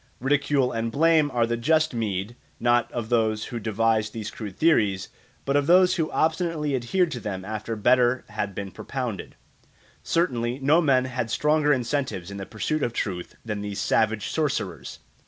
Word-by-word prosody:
Ridicule 140 -1 +1
and 115 0 -2
blame 160 +1 +3
are 120 -3 +1
the 120 0 -1
just 155 +5 +2
meed, 105 -1 -2 0.2
not 120 0 +2
of 115 -2 -4
those 110 -3 +1
who 120 - -2
devised 110 0 0
these 110 -2 -5
crude 105 -4 -8
theories, 105 - +2 0.4
but 140 - 0
of 145 0 +2
those 185 +1 +5
who 160 -2 0
obstinately 160 -2 0
adhered 160 +8 0
to 125 - -4
them 95 -4 -5
after 110 +2 -4
better 125 +3 +3
had 105 -2 -4
been 100 -1 -5
propounded. 125 -8 -5 0.7
Certainly 125 -8 0
no 145 +5 +3
men 130 -5 +3
ever 130 - -7
had 115 -3 -1
stronger 150 +4 +2
incentives 125 -8 -1
in 100 - -7
the 95 - -6
pursuit 145 +8 -2
of 120 - -1
truth 90 -6 -4
than 105 -2 -3
these 100 -1 -4
savage 110 -2 +1
sorcerers. 140 - -2
120 Hz, 175 wpm, -25 LUFS, 110-145 Hz, 0.7 s, those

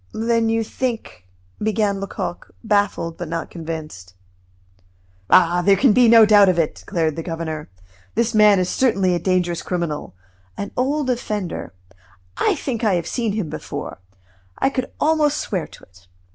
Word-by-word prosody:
"Then 230 0 +1
you 225 0 +1
think 225 - -5 0.2
" - - -35
began 210 -2 0
Lecoq, 195 -2 -5
baffled 205 -6 0
but 175 - -5
not 165 +1 -4
convinced. 155 - -7 1.1
"Ah! 175 0 +5
there 195 +2 +4
can 250 +1 +4
be 245 +1 +5
no 225 -1 +8
doubt 205 -2 +6
of 180 - +1
it," 165 -3 +1
declared 160 -3 -2
the 165 - -4
governor. 160 - -5 0.5
"This 235 +1 +1
man 210 -2 +6
is 185 -1 +1
certainly 195 -6 +1
a 175 - 0
dangerous 180 -2 0
criminal 170 - -4 0.4
an 200 - -5
old 270 +1 0
offender 210 - -4 0.6
I - - +1
think 240 -4 -4
I 210 -4 +3
have 170 -2 -2
seen 230 -1 -2
him 210 -6 -2
before - - -6 0.6
I 270 - +1
could 255 -2 -3
almost 300 -1 +2
swear 185 - -3
to - - -16
it." 90 0 -21
200 Hz, 160 wpm, -21 LUFS, 170-230 Hz, 1.1 s, no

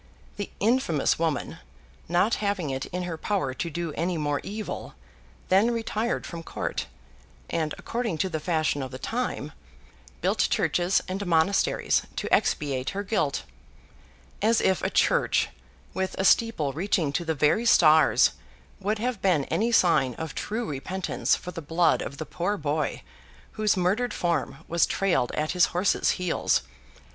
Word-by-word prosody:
The 205 - -4
infamous 210 - +2
woman, 160 -4 -1 0.5
not 180 +6 +2
having 200 -8 -1
it 130 0 -3
in 180 +1 -4
her 170 -2 -5
power 185 -11 -1
to 170 - -3
do 170 -1 -4
any 170 +2 -1
more 145 -2 -1
evil, 210 +1 -6 0.5
then 195 +5 +5
retired 230 0 -1
from 170 -1 -6
court, - - -4 0.6
and, 155 -2 -1
according, 230 -7 -3
to 190 - 0
the 160 -3 -2
fashion 155 -3 0
of 130 - -4
the 130 - -7
time, 225 - -3 0.7
built - - +1
churches 180 +2 +1
and 190 +2 -3
monasteries, 170 +3 +2
to - - -2
expiate 135 -3 +1
her 200 - -1
guilt. 195 -9 0 1.0
As 220 +2 +3
if 190 - +2
a - - 0
church, - - +2 0.4
with 190 0 -2
a 190 - 0
steeple 190 -12 +3
reaching 165 -3 0
to 175 - 0
the 160 -1 -1
very 150 - +2
stars, 155 -6 +6 0.5
would 210 +3 -1
have 235 -1 -2
been 180 -7 +3
any 230 +3 +1
sign 170 - +3
of 160 -3 -5
true 225 +3 -3
repentance 175 +7 -1
for 180 - -7
the 165 - -6
blood 165 +3 +2
of 140 - -6
the 155 - -5
poor 180 +6 -2
boy, 150 -2 -2 0.5
whose 215 -2 +1
murdered 205 +7 +1
form 170 -1 -2
was 170 0 +2
trailed 175 -10 +1
at 155 +1 -1
his 180 -1 +4
horse's 180 +3 +1
heels! 180 -2 +1
175 Hz, 155 wpm, -26 LUFS, 155-205 Hz, 1.0 s, stars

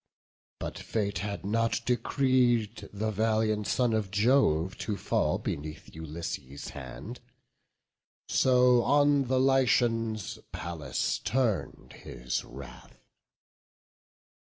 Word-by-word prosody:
But - - -6
fate 100 -5 -2
had 100 +1 -4
not 115 +3 +1
decreed 120 -4 +1
the 110 +2 -2
valiant 110 0 +1
son 125 -3 +1
Of 110 -3 0
Jove 100 - +2
to 105 -2 -3
fall - - 0
beneath 75 +1 -6
Ulysses' 80 -3 -6
hand; 105 - -8 1.1
So 125 -1 +4
on 145 +1 +3
the 130 +1 +1
Lycians 115 -5 +2
Pallas 85 -4 -3
turn'd 105 - -1
his 60 +1 -4
wrath. 65 +1 -12
110 Hz, 95 wpm, -29 LUFS, 95-125 Hz, 1.1 s, So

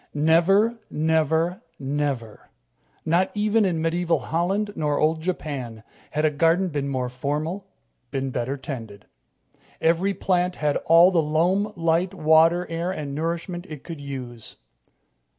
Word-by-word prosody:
Never, 185 +9 +3
never, 160 +4 +1 0.2
never 135 -5 -3 0.6
not 175 +4 +2
even 210 +1 +2
in 165 -4 0
medieval 170 0 +1
Holland 180 +9 -1
nor 150 -2 0
old 160 +1 +1
Japan 140 -10 -4 0.3
had 155 +1 0
a 155 - +3
garden 165 +5 +2
been 145 -3 -2
more 130 -2 -1
formal, 150 +9 -3 0.4
been 135 0 -3
better 125 +3 -2
tended. 115 -7 -8 0.7
Every 175 +5 +2
plant 180 0 0
had 150 -1 0
all 170 +3 +7
the 170 -3 +3
loam, 175 +7 +1
light, 170 +2 +1
water, 165 +2 +4
air 165 +2 -3
and 150 -6 -5
nourishment 170 +4 -3
it 150 -3 -8
could 165 -4 -8
use. 125 -5 -7
160 Hz, 135 wpm, -24 LUFS, 145-180 Hz, 0.7 s, all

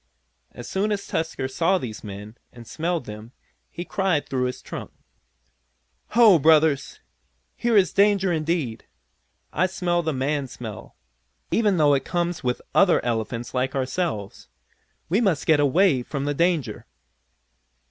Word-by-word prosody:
As 120 - -10
soon 205 +3 -1
as 200 -1 -2
Tusker 160 -5 -2
saw 165 +8 +1
these 120 -10 -7
men, 105 +1 -8 0.2
and 120 -1 -13
smelled 165 +2 -2
them, 105 +3 -10 0.4
he 175 - -7
cried 190 -7 0
through 130 -1 -1
his 125 - -5
trunk: - - -7 1.3
"Ho, 215 -8 +7
Brothers! 160 - +3 0.5
Here 235 -2 +2
is 190 -3 +3
danger 200 -2 +3
indeed! 155 -7 -2 0.7
I 185 +4 +2
smell 175 -2 0
the 160 -1 -1
man 140 +1 -1
smell, 120 -4 -9 0.6
even 210 -5 +2
though 150 -2 +4
it 135 - +1
comes 175 -2 -2
with 125 -1 -1
other 190 -4 +5
elephants 115 0 -3
like 130 +2 -1
ourselves. 130 - -3 0.6
We 195 +8 +1
must 190 -10 +1
get 155 -2 +4
away 145 0 +3
from 140 +3 -4
the 145 - 0
danger!" 170 -2 0
155 Hz, 140 wpm, -24 LUFS, 125-180 Hz, 1.3 s, Ho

